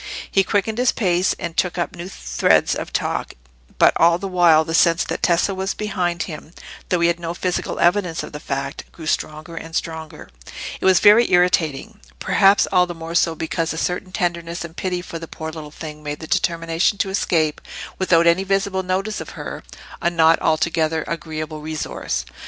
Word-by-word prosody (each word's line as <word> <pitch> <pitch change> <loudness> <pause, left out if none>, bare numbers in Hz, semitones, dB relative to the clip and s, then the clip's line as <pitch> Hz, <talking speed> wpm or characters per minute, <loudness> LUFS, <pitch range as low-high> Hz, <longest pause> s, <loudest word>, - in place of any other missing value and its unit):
He 195 - +4
quickened 210 +4 -1
his 250 0 +4
pace, 180 -3 +1
and 170 -1 -5
took 180 -1 0
up 170 -2 -2
new 175 +2 -7
threads 60 - +2
of - - -5
talk; - - -2 0.4
but - - +5
all 170 +1 +5
the 195 - -5
while 170 -4 +4
the 165 - -4
sense 165 +1 +4
that - - -4
Tessa 175 +3 +2
was 190 +1 -3
behind 180 -5 -1
him, 155 -1 -9 0.4
though 180 -2 +1
he 170 - +4
had 170 0 0
no 170 0 -4
physical 180 0 -2
evidence 175 -2 +1
of - - -8
the 150 - -7
fact, 140 -1 -5
grew 160 - -11
stronger 155 +2 -3
and 165 0 -7
stronger; 160 -1 -5 0.5
it - - -4
was 190 -1 +6
very 215 +3 +6
irritating—perhaps 180 +3 +2
all 180 0 +4
the 175 - -6
more 165 0 -7
so 165 -1 +2
because 160 +1 -2
a - - -6
certain 180 +3 -2
tenderness 170 -3 -2
and 165 -1 -11
pity 180 -1 -2
for 165 - -7
the 165 - -8
poor 160 0 -6
little 155 -1 -8
thing 150 0 -9
made 150 -1 -5
the 160 - -7
determination 165 +4 0
to 195 - -1
escape 160 -6 0 0.4
without 170 -3 +3
any 170 +3 +4
visible 195 0 0
notice 190 +3 -2
of - - -8
her, - - -6 0.4
a 170 - +2
not 165 -1 +4
altogether 160 0 +1
agreeable 155 -1 -5
resource. 155 - -3
170 Hz, 185 wpm, -21 LUFS, 160-185 Hz, 0.5 s, was